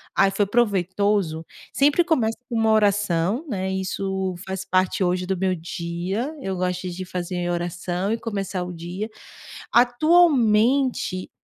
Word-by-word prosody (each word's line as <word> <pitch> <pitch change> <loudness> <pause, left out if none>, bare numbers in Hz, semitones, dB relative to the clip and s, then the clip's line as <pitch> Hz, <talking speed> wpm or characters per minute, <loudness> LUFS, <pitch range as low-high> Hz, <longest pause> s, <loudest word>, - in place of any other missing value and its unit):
"Ai, 195 0 +4
foi 200 +1 +1
proveitoso", 200 -5 +1 0.3
sempre 290 +5 +4
começa 235 -10 +1
com 235 - -3
uma 225 0 +3
oração, 205 - +2
né, 190 -4 -2
isso 190 0 -2
faz 190 0 -3
parte, 185 +1 +1
hoje, 180 0 0
do 190 0 -1
meu 190 +1 +1
dia, 175 - -4
eu 190 -6 -3
gosto 180 0 -2
de 180 +1 -5
fazer 180 -1 -3
oração 175 +3 -2
e - - -1
começar 195 -4 -3
o 180 - -6
dia. 175 +6 -5 0.6
Atualmente, 245 - +3
190 Hz, 135 wpm, -23 LUFS, 180-220 Hz, 0.6 s, Ai